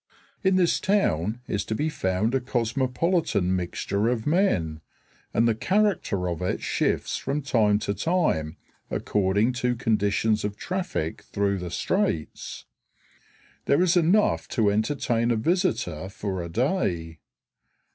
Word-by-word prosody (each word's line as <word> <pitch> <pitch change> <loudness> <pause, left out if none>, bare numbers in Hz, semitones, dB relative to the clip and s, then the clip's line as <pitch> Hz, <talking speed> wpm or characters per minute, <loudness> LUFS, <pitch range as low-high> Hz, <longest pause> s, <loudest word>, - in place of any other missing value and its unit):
In 190 -1 +3
this 180 -2 +3
town 115 - +1
is 100 - -1
to 110 - -2
be 150 +7 0
found 100 -5 0
a 135 - +3
cosmopolitan 125 - 0
mixture 95 +4 -1
of 120 -2 -1
men, 100 - +1 0.5
and 115 - +3
the 115 - +3
character 185 - +1
of 85 -1 -3
it 90 - -1
shifts - - 0
from 140 +2 -2
time 110 -6 +3
to 100 - 0
time 130 - 0 0.3
according 105 +4 +1
to 125 0 +1
conditions 110 -1 +1
of 105 0 -3
traffic 180 - -3
through 100 -1 0
the 90 -1 -5
straits. 80 -2 -2 1.0
There 140 +6 +3
is 180 -1 +3
enough 180 +5 +3
to 110 -5 +2
entertain 115 +1 0
a 120 - +3
visitor 110 - 0
for 95 -2 -4
a 85 - -6
day. 85 - -1
110 Hz, 135 wpm, -25 LUFS, 95-150 Hz, 1.0 s, In